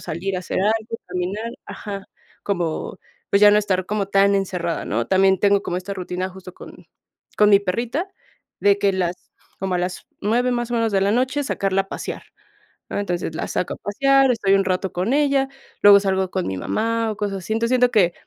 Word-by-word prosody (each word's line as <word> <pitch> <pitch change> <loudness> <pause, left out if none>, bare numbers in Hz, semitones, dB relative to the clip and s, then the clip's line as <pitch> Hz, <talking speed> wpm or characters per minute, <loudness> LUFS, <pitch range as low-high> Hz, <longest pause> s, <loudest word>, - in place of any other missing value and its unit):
salir 180 +3 -3
a - - -3
hacer 185 - -3
algo, 220 +3 0
caminar 195 +6 -3
ajá. 200 -2 -7 0.4
Como 175 -2 -3 0.3
pues 200 - +3
ya 205 - +9
no 210 - +5
estar 185 -3 0
como 205 -1 -1
tan 200 0 +4
encerrada, 180 -4 -2
¿no? 115 +3 -1
También 190 0 +3
tengo 200 0 +3
como 175 - -3
esta 185 +2 -5
rutina 185 0 -4
justo 185 0 -11
con - - -13 0.5
con 210 0 +5
mi 200 -1 +6
perrita, 235 - -2 0.5
de 200 0 +4
que 200 -1 +2
las 180 -2 -3 0.3
como 190 -1 -1
a - - +1
las 180 +1 -4
9 240 +4 +1
más 240 -1 -2
o - - +1
menos, 230 -1 +1
de 195 - +2
la 200 +1 +2
noche 260 +5 0
sacarla 195 -7 0
a 195 - -21
pasear, - - -6 0.7
¿no? - - -2
Entonces, 175 -4 -3
la - - -3
saco - - -2
a - - -17
pasear, 270 +5 +3
estoy 205 -4 +1
un 195 0 +2
rato 185 0 -1
con 185 +8 -1
ella, 280 -2 +2 0.3
luego 205 0 +8
salgo 190 -1 0
con 185 -2 -2
mi 95 - -3
mamá, 225 - -1
o 210 - -7
cosas 200 -2 -2
así, 190 +4 -4
entonces 230 +2 0
siento 250 -1 +4
que 185 -7 +3
200 Hz, 205 wpm, -22 LUFS, 185-225 Hz, 0.7 s, ya